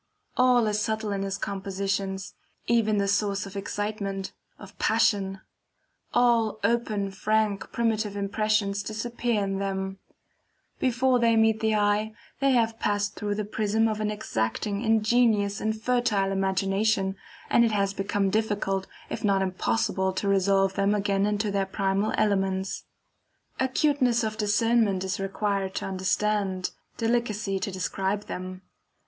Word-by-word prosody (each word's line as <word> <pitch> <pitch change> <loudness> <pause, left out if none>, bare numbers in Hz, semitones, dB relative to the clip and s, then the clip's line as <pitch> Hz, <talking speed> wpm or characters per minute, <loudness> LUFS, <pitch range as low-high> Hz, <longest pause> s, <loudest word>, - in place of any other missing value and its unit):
All 250 -2 +4
is 210 0 0
subtle 220 -1 -1
in 200 -1 -2
his 195 -1 -2
compositions, 195 -1 -3 0.3
even 225 -2 +2
the 200 0 +1
source 200 0 0
of 195 0 -10
excitement, 200 -1 -3 0.3
of 200 0 -13
passion; 200 -4 +2 0.7
all 230 -3 +3
open, 210 -3 0
frank, 210 0 0
primitive 220 -3 0
impressions 205 0 0
disappear 225 +1 -2
in 195 0 -2
them; 190 0 -3 0.8
before 255 0 +2
they 230 -1 +4
meet 220 0 +3
the 220 -1 +1
eye, 210 +1 +1 0.2
they 275 - +3
have 225 -2 +1
passed 205 0 0
through 205 -1 -3
the 210 0 -2
prism 215 +1 +1
of 215 -1 -2
an 210 - 0
exacting, 200 - -2
ingenious, 220 -2 +2
and 220 0 -1
fertile 220 -5 +1
imagination, 195 +1 +1 0.4
and 235 - +5
it 230 - +2
has 200 -2 +1
become 195 0 0
difficult 205 -3 0 0.2
if - - -4
not 195 -2 +3
impossible 190 0 0
to 200 - -2
resolve 195 0 +3
them 200 +2 +2
again 200 0 +1
into 210 0 0
their 195 -1 0
primal 195 +1 0
elements. 190 -2 0 0.7
Acuteness 260 -2 +2
of 215 -1 -2
discernment 210 -2 +2
is 190 0 -2
required 195 0 -2
to - - -2
understand, 190 0 0 0.3
delicacy 225 -4 0
to 200 - -2
describe 190 +2 -2
them. 185 0 -7
205 Hz, 135 wpm, -26 LUFS, 195-220 Hz, 0.8 s, and